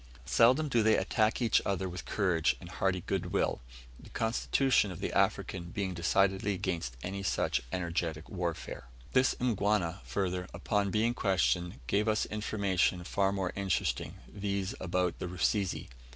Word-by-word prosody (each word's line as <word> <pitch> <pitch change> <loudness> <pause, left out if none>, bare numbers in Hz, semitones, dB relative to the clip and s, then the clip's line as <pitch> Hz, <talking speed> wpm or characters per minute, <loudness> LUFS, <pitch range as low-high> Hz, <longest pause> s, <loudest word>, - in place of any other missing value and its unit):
Seldom 130 - +4
do 120 -5 +2
they 110 0 +4
attack 110 +3 +1
each 115 - +4
other 95 -1 -1
with 90 0 -6
courage 90 -6 +1
and 85 - -10
hearty 90 +1 0
goodwill, - - -1 0.4
the - - -14
constitution 115 +1 +2
of 90 - -7
the - - -3
African 85 -2 +1
being 95 +1 -3
decidedly 95 +3 +2
against 85 - -3
any 100 +2 -4
such 95 - 0
energetic 85 -3 -2
warfare. 85 -8 -4 0.3
This 130 0 +4
Mgwana, 105 -6 0
further, 90 -2 -2
upon 100 -2 0
being 110 +4 +2
questioned, 90 - 0
gave 105 - +1
us 110 0 +2
information 100 -4 0
far 95 +2 +1
more 95 -2 -2
interesting, 95 -3 -1
viz., 100 -2 -3
about 90 0 -1
the - - -3
Rusizi. 90 +2 0
95 Hz, 145 wpm, -31 LUFS, 90-105 Hz, 0.4 s, Seldom